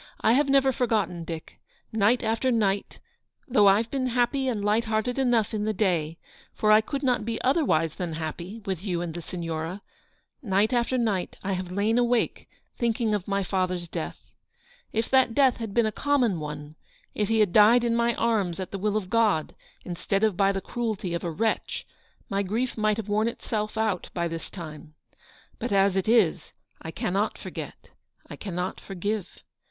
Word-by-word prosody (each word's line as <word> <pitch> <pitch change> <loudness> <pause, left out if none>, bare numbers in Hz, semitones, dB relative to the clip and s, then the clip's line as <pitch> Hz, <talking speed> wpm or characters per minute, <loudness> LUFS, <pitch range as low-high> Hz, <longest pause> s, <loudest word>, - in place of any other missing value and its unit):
I 220 - +4
have 275 +2 +3
never 270 -1 +4
forgotten, 220 -9 0
Dick. 160 -1 -7 0.3
Night 220 +4 +3
after 225 +3 +1
night 205 -5 0 0.3
— - - -45
though 215 -6 +5
I've 215 +4 +4
been 265 -2 0
happy 250 +2 +1
and 215 -5 -1
light 215 +3 +2
hearted 220 +4 -1
enough 240 -5 +2
in 210 -1 -1
the 215 0 -1
day, 170 -6 0 0.4
for 215 - +2
I 215 +1 +7
could 280 +5 -4
not 250 -4 +2
be 225 +1 -3
otherwise 250 - +2
than 175 -1 -4
happy 170 +7 -6
with 190 -3 -3
you 175 -4 -1
and 170 -2 -4
the 175 - -5
Signora 165 +2 -5 0.3
— - - -46 0.2
night 215 +5 +3
after 240 +1 +1
night 210 -7 -1
I 195 - -2
have 185 -1 -4
lain 210 +5 +2
awake 240 -1 0 0.3
thinking 230 -2 +1
of 200 -3 -2
my 200 0 0
father's 185 -2 -1
death. - - -6 0.6
If 225 +1 -1
that 260 -4 +4
death 270 -3 +4
had 225 -3 -5
been 235 +2 +3
a 215 - 0
common 245 - +1
one; 150 0 -7 0.4
if 210 - 0
he 225 0 +2
had 205 -5 +3
died 225 +3 +7
in 235 -1 +1
my 235 0 +2
arms 205 -7 0
at 185 - -5
the 195 - -4
will 210 +2 +1
of 200 -4 -3
God 215 -9 +2 0.3
instead 195 +3 -1
of 215 -4 +3
by 195 +1 +3
the 195 -1 -3
cruelty 215 -5 -3
of 170 - -3
a 175 - -1
wretch, 220 +8 -1 0.4
my 195 0 0
grief 225 +6 -1
might 215 -1 +1
have 220 -2 -4
worn 215 +2 +1
itself 215 -2 -3
out 215 -5 0
by 170 -1 0
this 165 0 -6
time. 155 -3 -9 0.6
But 240 - -3
as 195 -1 +3
it 190 +2 0
is, 220 -8 +3 0.3
I 160 - -6
cannot 195 +5 -1
forget; - - -8 0.4
I - - -8
cannot 180 -2 -4
forgive. 200 +1 -4
210 Hz, 190 wpm, -26 LUFS, 180-230 Hz, 0.6 s, I